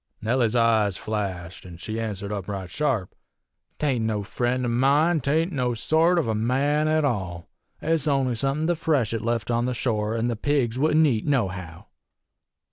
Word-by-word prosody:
"Nellie's 120 Hz, 0 st, +1 dB
eyes 110 Hz, -5 st, +3 dB
flashed, 95 Hz, -5 st, -4 dB
an' 90 Hz, -2 st, -11 dB
she 110 Hz, +6 st, -5 dB
answered 105 Hz, -3 st, -4 dB
up 100 Hz, -3 st, -4 dB
right 95 Hz, -3 st, -5 dB
sharp: 130 Hz, -11 st, -1 dB, 0.6 s
''T -, -, -9 dB
ain't 125 Hz, -6 st, +1 dB
no 105 Hz, -2 st, -1 dB
friend 125 Hz, +4 st, -1 dB
of 120 Hz, -, 0 dB
mine. 145 Hz, +7 st, +3 dB
'T 140 Hz, -, -2 dB
ain't 165 Hz, +5 st, +1 dB
no 125 Hz, -5 st, -1 dB
sort 160 Hz, +9 st, +2 dB
of 165 Hz, -, +1 dB
a 110 Hz, -, 0 dB
man 135 Hz, +7 st, +1 dB
at 155 Hz, -1 st, +2 dB
all. 95 Hz, -10 st, -3 dB, 0.4 s
It's 160 Hz, -2 st, +1 dB
only 135 Hz, -3 st, +1 dB
somethin' 135 Hz, +6 st, -1 dB
the 175 Hz, +1 st, +1 dB
freshet 130 Hz, -9 st, 0 dB
left 115 Hz, +1 st, -1 dB
on 120 Hz, +1 st, +1 dB
the 125 Hz, 0 st, -2 dB
shore, 110 Hz, -2 st, -1 dB
an' 115 Hz, -, 0 dB
the 120 Hz, -1 st, 0 dB
pigs 130 Hz, -1 st, 0 dB
wouldn't 155 Hz, +2 st, +4 dB
eat 120 Hz, -5 st, 0 dB
nohow.' 95 Hz, -, -2 dB
120 Hz, 185 wpm, -25 LUFS, 105-145 Hz, 0.6 s, wouldn't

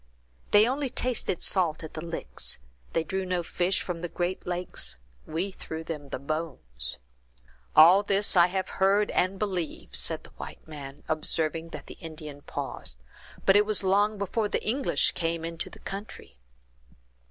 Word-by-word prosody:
They 210 Hz, +2 st, +7 dB
only 270 Hz, +2 st, 0 dB
tasted 245 Hz, -8 st, 0 dB
salt 170 Hz, -5 st, +2 dB
at 160 Hz, -, -7 dB
the 155 Hz, -, -5 dB
licks; 165 Hz, -1 st, -2 dB, 0.4 s
they 165 Hz, -, +2 dB
drew 190 Hz, +3 st, -2 dB
no 180 Hz, -1 st, 0 dB
fish 180 Hz, +3 st, 0 dB
from 175 Hz, -2 st, -4 dB
the 175 Hz, -, -3 dB
great 175 Hz, +2 st, -2 dB
lake; 180 Hz, 0 st, -3 dB, 0.5 s
we 170 Hz, +5 st, -1 dB
threw 160 Hz, -3 st, -6 dB
them 150 Hz, -4 st, -6 dB
the -, -, -3 dB
bones." 130 Hz, -, -4 dB, 0.8 s
"All 175 Hz, +5 st, +9 dB
this 200 Hz, 0 st, +2 dB
I 175 Hz, -1 st, +8 dB
have 190 Hz, 0 st, -1 dB
heard 200 Hz, +2 st, +4 dB
and 185 Hz, +2 st, +2 dB
believe," 185 Hz, -6 st, -3 dB
said -, -, +1 dB
the -, -, -14 dB
white -, -, -9 dB
man, 145 Hz, -2 st, -8 dB
observing 160 Hz, +1 st, +1 dB
that 150 Hz, -3 st, -8 dB
the -, -, -11 dB
Indian 155 Hz, -3 st, -8 dB
paused; -, -, -3 dB, 0.5 s
"but 195 Hz, -, +6 dB
it 205 Hz, 0 st, +6 dB
was 215 Hz, -2 st, +3 dB
long 205 Hz, +3 st, +3 dB
before 205 Hz, +2 st, 0 dB
the -, -, -1 dB
English 260 Hz, +5 st, +2 dB
came 165 Hz, -1 st, -1 dB
into 165 Hz, 0 st, -2 dB
the -, -, -12 dB
country." 195 Hz, -, -8 dB
175 Hz, 165 wpm, -28 LUFS, 160-195 Hz, 0.8 s, All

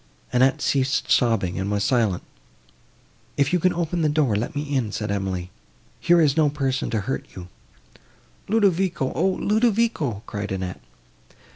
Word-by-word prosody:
Annette 130 Hz, +2 st, +3 dB
ceased 135 Hz, 0 st, 0 dB
sobbing, 110 Hz, -8 st, +2 dB
and 95 Hz, +1 st, -2 dB
was 100 Hz, -1 st, 0 dB
silent. 105 Hz, -4 st, +1 dB, 1.1 s
"If 140 Hz, +5 st, +1 dB
you 180 Hz, -, +3 dB
can 185 Hz, +2 st, +3 dB
open 170 Hz, 0 st, -2 dB
the 155 Hz, -, +2 dB
door, 145 Hz, -7 st, +1 dB
let 115 Hz, +7 st, -3 dB
me 145 Hz, -, -1 dB
in," 135 Hz, -7 st, -1 dB
said 105 Hz, 0 st, -3 dB
Emily, 95 Hz, -3 st, -3 dB, 0.5 s
"here 175 Hz, 0 st, +4 dB
is 150 Hz, -4 st, +3 dB
no 155 Hz, -2 st, +3 dB
person 135 Hz, -2 st, -1 dB
to 110 Hz, -2 st, -1 dB
hurt 70 Hz, -8 st, -4 dB
you." 90 Hz, 0 st, -9 dB, 1.0 s
"Ludovico!—O, 190 Hz, -9 st, +1 dB
Ludovico!" 210 Hz, -, 0 dB
cried 100 Hz, -2 st, -5 dB
Annette. 95 Hz, -1 st, -4 dB
130 Hz, 145 wpm, -23 LUFS, 100-165 Hz, 1.1 s, here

